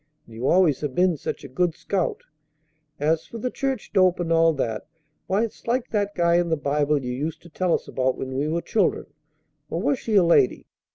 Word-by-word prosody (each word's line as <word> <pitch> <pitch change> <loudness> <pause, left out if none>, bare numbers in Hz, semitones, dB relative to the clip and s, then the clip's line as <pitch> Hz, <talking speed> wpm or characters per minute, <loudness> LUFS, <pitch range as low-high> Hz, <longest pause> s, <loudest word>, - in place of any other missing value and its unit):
And 115 - -16
you 120 +4 -3
always 175 -6 +3
have 145 -4 -3
been 180 -1 +3
such 145 - -5
a - - -7
good 165 +5 0
scout. 195 -3 -2 0.8
As 155 +2 0
for 235 - -8
the 250 +3 -3
church 270 -5 -3
dope 185 -3 +4
and 165 -1 0
all 165 0 +5
that, 115 -6 -3 0.4
why, 195 +4 +2
it's 230 - -7
like 245 +1 0
that 205 -2 -1
guy 170 0 +3
in 175 -1 +1
the 160 - +1
Bible 145 0 0
you 125 - -2
used 150 +5 -4
to 170 - -13
tell 180 +2 -1
us - - -5
about 130 0 0
when 130 0 -5
we 140 +3 0
were 170 +2 -1
children 205 -5 +1 0.6
or 165 - -2
was 255 +6 +1
she 220 - -2
a 195 - +6
lady? 170 -6 +3
170 Hz, 220 wpm, -24 LUFS, 145-190 Hz, 0.8 s, a